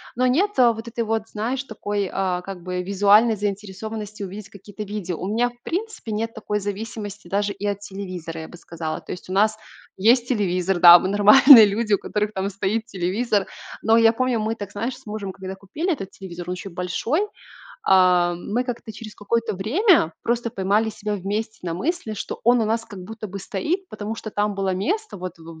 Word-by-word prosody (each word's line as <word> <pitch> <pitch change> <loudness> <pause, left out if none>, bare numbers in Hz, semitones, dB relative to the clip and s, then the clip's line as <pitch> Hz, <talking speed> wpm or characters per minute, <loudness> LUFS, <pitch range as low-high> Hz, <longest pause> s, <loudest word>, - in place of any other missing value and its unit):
Но 250 +1 +1
нет 355 +12 +2
вот 235 -2 +3
этой 235 0 -2
вот, 220 0 -2
знаешь, 240 +6 -3
такой, 205 -4 -3
а, 185 -2 -1
как 180 -1 -8
бы 180 0 -3
визуальной 205 +4 +4
заинтересованности 210 +1 -5
увидеть 200 +1 -7
какие-то 205 +1 -9
видео. 200 -4 -4
У 185 - -4
меня 235 +4 +1
в 240 0 -21
принципе 380 - -4
нет 225 +2 -2
такой 210 -2 -3
зависимости 205 -1 -6
даже 200 +2 0
и 200 - -6
от 200 -1 -1
телевизора, 185 -5 -7
я 160 - -8
бы - - -12
сказала. 160 -2 -6
То - - -9
есть 180 - -8
у - - -3
нас 215 +2 +3 0.4
есть 235 +5 +4
телевизор, 190 -5 0
да, 175 0 +11
мы 185 - -2
нормальные 215 +4 +9
люди, 215 +2 -1
у - - +5
которых 210 +1 -2
там 195 0 -2
стоит 205 +3 -2
телевизор. 200 +1 -1 0.3
Но 225 0 +4
я 225 0 +5
помню, 255 -1 0
мы 220 +1 -1
так, 205 -3 -7
знаешь, 230 +6 -3
с 265 - -20
мужем, 210 -3 -5
когда 190 0 -7
купили 245 - -3
этот 225 - -4
телевизор, 185 -3 -10
он 180 - -2
еще 180 +2 -7
большой, 180 - -1 0.6
а, 180 -2 +4
мы 210 +8 -2
как-то 245 -2 -5
через 215 0 -10
какое-то 230 +2 -1
время 240 - +3
просто 235 0 -1
поймали 205 +1 +1
себя 210 0 -4
вместе 205 +3 -4
на 170 -2 -2
мысли, 275 - -2
что 205 - -6
он 240 +2 +5
у - - +2
нас 225 +1 -1
как 205 -4 -11
будто 215 +1 -7
бы 200 +2 -6
стоит, 310 - -3
потому 215 +1 -5
что 220 - -7
там 205 -1 -1
было 195 -1 0
место 410 - -2
вот 180 -2 -7
в 165 0 -12
205 Hz, 200 wpm, -23 LUFS, 190-225 Hz, 0.6 s, да